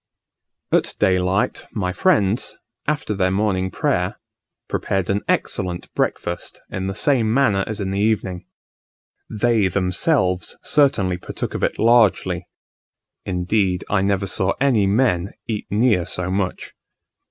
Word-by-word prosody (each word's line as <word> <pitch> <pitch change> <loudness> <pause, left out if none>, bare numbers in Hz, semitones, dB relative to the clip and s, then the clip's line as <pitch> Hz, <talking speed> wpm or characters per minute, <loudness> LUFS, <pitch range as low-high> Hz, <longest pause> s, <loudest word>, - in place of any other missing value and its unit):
At - - +1
daylight 95 +1 +1
my 90 -4 -2
friends, 110 - +1 0.3
after 150 -7 -1
their 95 -2 +1
morning 95 -1 0
prayer, - - -1 0.5
prepared 95 -1 -1
an 100 +1 0
excellent 90 -1 -2
breakfast - - -2
in 95 0 -3
the 95 - -3
same 115 -2 +2
manner 110 -6 +3
as 110 -1 -4
in 95 -2 -2
the 100 - -1
evening. 95 -4 -1 0.8
They 110 -2 +2
themselves 90 - +1
certainly 105 -11 +2
partook 90 - -5
of - - -4
it - - 0
largely; 115 -3 +3 0.8
indeed 90 0 0
I 100 -2 +3
never 100 0 +1
saw 95 +1 +1
any 125 -8 +3
men 100 -4 +1
eat 110 -2 -4
near 105 -4 +2
so 90 0 -3
much. 95 -1 -2
100 Hz, 130 wpm, -21 LUFS, 95-110 Hz, 0.8 s, manner